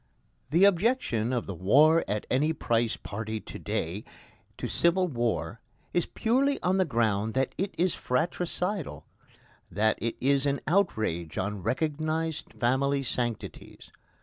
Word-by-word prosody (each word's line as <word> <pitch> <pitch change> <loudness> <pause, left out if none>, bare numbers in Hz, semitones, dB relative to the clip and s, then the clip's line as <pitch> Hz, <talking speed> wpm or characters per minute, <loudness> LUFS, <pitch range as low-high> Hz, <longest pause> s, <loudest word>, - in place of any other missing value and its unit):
The 170 +7 +5
objection 180 - +2
of 120 -2 -1
the 100 - -5
war 145 - +5
at 105 +1 -2
any 150 +5 +2
price 115 -5 0
party 110 +1 -5
to - - -9
day 90 +6 -3 0.5
to - - -3
civil 180 +2 +2
war 120 - -2 0.3
is 175 - +1
purely 270 +5 +1
on 185 +1 +2
the 190 - +3
ground 110 - 0
that 130 0 +1
it 195 +1 -3
is 180 0 +2
fratricidal 175 - -2 0.6
that 110 +4 +1
it 115 0 -1
is 140 +1 +2
an 140 0 0
outrage 110 - 0
on 100 +1 -2
recognised 155 - -2
family 135 +4 +1
sanctities. 120 -3 -5
135 Hz, 135 wpm, -28 LUFS, 110-170 Hz, 0.6 s, The